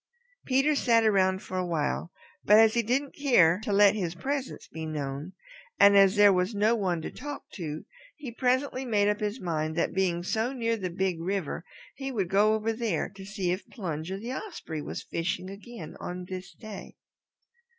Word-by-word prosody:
Peter 270 +3 +3
sat 235 -5 +3
around 190 -2 +2
for 185 - -5
a - - 0
while, 170 0 -2 0.3
but 210 - +6
as 220 0 +6
he 235 - +2
didn't 260 +5 0
care 185 - +4
to 210 - -2
let 200 0 +6
his 180 -5 -3
presence 270 +7 -4
be 160 - -7
known, 150 +2 -4 0.5
and 200 0 +7
as 195 0 +6
there 205 -1 +7
was 180 +4 0
no 210 +3 +3
one 180 -7 -1
to - - -5
talk 290 +1 -7
to, 155 -4 -6 0.3
he 285 -6 -7
presently 255 +2 0
made 210 -5 +2
up 210 0 +1
his 210 +3 -2
mind 160 -4 -2
that 170 - 0
being 180 -2 0
so 225 +7 -1
near 230 -3 0
the 190 -5 -3
Big 180 -1 -1
River 180 -3 -2 0.3
he 270 0 -5
would 195 -8 -1
go 210 +3 +4
over 220 +1 -1
there 230 -1 -1
to 195 - -12
see 195 -2 -2
if 185 +3 -4
Plunger 175 - -4
the 235 +5 -5
Osprey 260 - -6
was - - -6
fishing 185 +2 -3
again 200 -4 -9
on 180 0 -5
this 185 0 -7
day. 215 -3 -10
200 Hz, 190 wpm, -28 LUFS, 180-230 Hz, 0.5 s, and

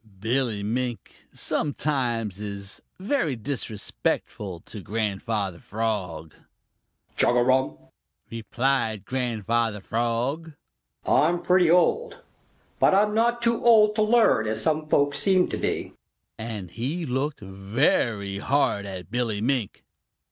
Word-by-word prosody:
Billy 115 -1 0
Mink 120 +2 -4
sometimes 120 -9 -1
is 100 -1 -6 0.2
very 190 - 0
disrespectful 105 -6 -3
to 105 - -9
Grandfather 100 -1 -2
Frog. 95 -8 -3 0.8
"Chugarum!" 125 - +2 0.5
replied 115 -2 -1
Grandfather 115 -3 -1
Frog. 120 +10 -2 0.5
"I'm 170 +3 +3
pretty 180 -2 +4
old, 420 - +3 0.6
but - - +5
I'm 210 +1 +3
not 235 +2 +1
too 235 0 +1
old 215 -3 +6
to 215 - +1
learn 215 - +4
as 110 - -2
some 155 -1 0
folks 145 -1 +2
seem 190 -2 +3
to - - -3
be," - - -2 0.4
and 105 -6 -6
he 140 - -3
looked 135 +2 -2
very 100 0 0
hard 115 -6 +1
at 95 0 -8
Billy 115 -4 -1
Mink. 120 -2 -1
120 Hz, 110 wpm, -25 LUFS, 105-150 Hz, 0.8 s, old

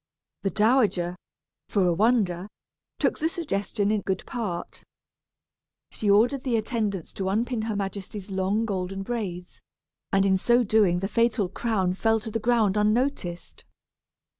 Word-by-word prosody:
The 195 - 0
dowager, 210 -6 +2 0.5
for 195 -3 +2
a 175 - +3
wonder, 195 -3 +2 0.5
took - - 0
the 320 - +1
suggestion 210 - -1
in 215 -1 +1
good 190 -1 -2
part. 210 -9 -5 1.1
She 210 - -2
ordered 245 +7 +4
the 250 -3 0
attendants 215 -5 -2
to 190 -1 -2
unpin 230 +3 0
her 220 -2 -2
majesty's 200 0 -5
long 195 +4 0
golden 195 -2 -3
braids, 190 -6 -5 0.5
and 195 0 +3
in 190 -1 +3
so 240 +5 +3
doing 200 -5 +3
the 195 - -1
fatal 230 -3 +1
crown 195 -4 0
fell 225 +3 +2
to 220 - -6
the 225 - -1
ground 220 -3 +2
unnoticed. 210 -5 -1
205 Hz, 140 wpm, -26 LUFS, 190-230 Hz, 1.1 s, ordered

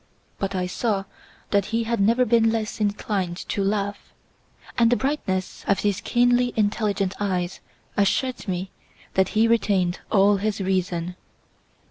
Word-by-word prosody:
But 195 0 -2
I 180 -1 0
saw 195 +2 -1 0.5
that 200 -2 +3
he 225 +2 -1
had 230 0 -1
never 230 +5 +4
been 225 -1 +4
less 220 -1 -2
inclined 200 -3 -1
to 200 - 0
laugh, 205 0 -2 0.6
and 235 -1 +4
the - - +5
brightness 215 -10 -2
of 200 - +2
his 205 -1 0
keenly 245 0 +2
intelligent 205 -2 0
eyes 185 -3 -1 0.4
assured 240 +5 0
me 185 0 -3 0.4
that 190 0 +2
he 225 +1 +5
retained 195 -6 +2
all 200 0 +5
his 210 +1 -1
reason. 180 -2 -1
205 Hz, 140 wpm, -24 LUFS, 190-225 Hz, 0.6 s, the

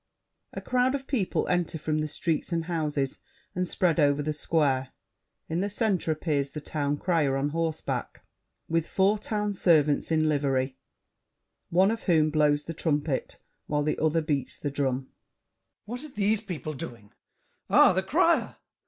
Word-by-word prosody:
[A - - -5
crowd 255 +1 +1
of 270 -1 -5
people 230 -10 -1
enter 175 -2 0
from 155 0 -1
the 155 - -1
streets 155 +2 -2
and 165 -1 -1
houses, 150 -5 -2 0.3
and 180 0 -1
spread 175 -1 +1
over 145 -1 +3
the 155 +1 -1
Square. 145 -4 +1 0.6
In 165 - -2
the 200 - -1
center 200 -6 0
appears 150 -3 -1
The 150 - -6
Town 145 -1 -2
Crier 150 -6 +1
on 140 +2 0
horseback, 160 0 -3 0.4
with 165 0 0
four 200 +2 +2
Town 210 -1 -2
servants 155 -6 +3
in 155 -1 +3
livery, 135 -3 0 0.9
one 190 +4 +4
of 225 - -4
whom 155 -4 +3
blows 150 -1 +2
the 165 - -6
trumpet, 150 -3 -1 0.3
while 150 0 0
the 150 - -1
other 160 +1 +2
beats 145 -5 -2
the 145 - -3
drum. 135 -2 0
GASSÉ. - - -24 0.8
What 245 +6 -6
are 305 - -8
these 210 -3 +1
people 160 - -5
doing? 115 -6 -8 0.6
Ah, - - +6
the - - +1
crier! - - +2
155 Hz, 160 wpm, -27 LUFS, 145-180 Hz, 0.9 s, Ah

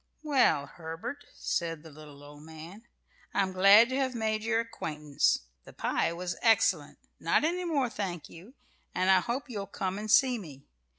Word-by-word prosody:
"Well, 260 - +3
Herbert," 170 - -8
said 165 -2 -3
the 160 - -12
little 145 -1 -13
old 145 0 -13
man, 160 +8 -12 0.5
"I'm 195 -2 +1
glad 200 +5 +7
to 260 - -2
have 260 -2 -1
made 220 -1 -1
your 225 0 +1
acquaintance. 150 - -1 0.2
The - - -14
pie - - 0
was 175 0 -4
excellent 225 -1 +2 0.2
not - - +2
any 355 +3 0
more, 290 -7 +1
thank 195 - -5
you 195 +11 -14 0.4
and 185 +1 +3
I 190 - +6
hope 240 +9 -3
you'll 205 -6 -5
come 190 0 -3
and 215 +1 -6
see 250 +1 +4
me. 145 -8 -11
195 Hz, 170 wpm, -29 LUFS, 160-235 Hz, 0.5 s, glad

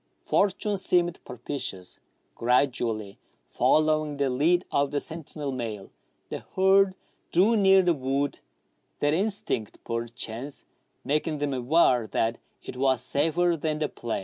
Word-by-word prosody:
Fortune 205 +1 +1
seemed 175 -2 +1
propitious. 125 -7 -6 0.3
Gradually 115 -4 0 0.3
following 155 -1 +2
the 140 -2 +1
lead 165 +8 +2
of 140 0 +2
the 145 - -1
sentinel 155 -2 -5
male, 115 -6 -5 0.4
the - - -4 0.2
herd 190 0 +4 0.4
drew 200 +7 +4
near 195 -2 +5
the 175 -1 +3
wood, 140 0 -2 0.6
their 145 0 +2
in 190 +7 +2
stinct, 115 - -2
perchance, 115 +3 -5 0.4
making 150 +2 0
them 145 -1 -1
aware 125 -2 +3
that 115 +1 -1 0.2
it 125 - -8
was 130 -1 +2
safer 170 +4 +1
than 155 -1 -2
the 150 -1 -1
plain. 120 -1 -4
145 Hz, 130 wpm, -26 LUFS, 125-170 Hz, 0.6 s, near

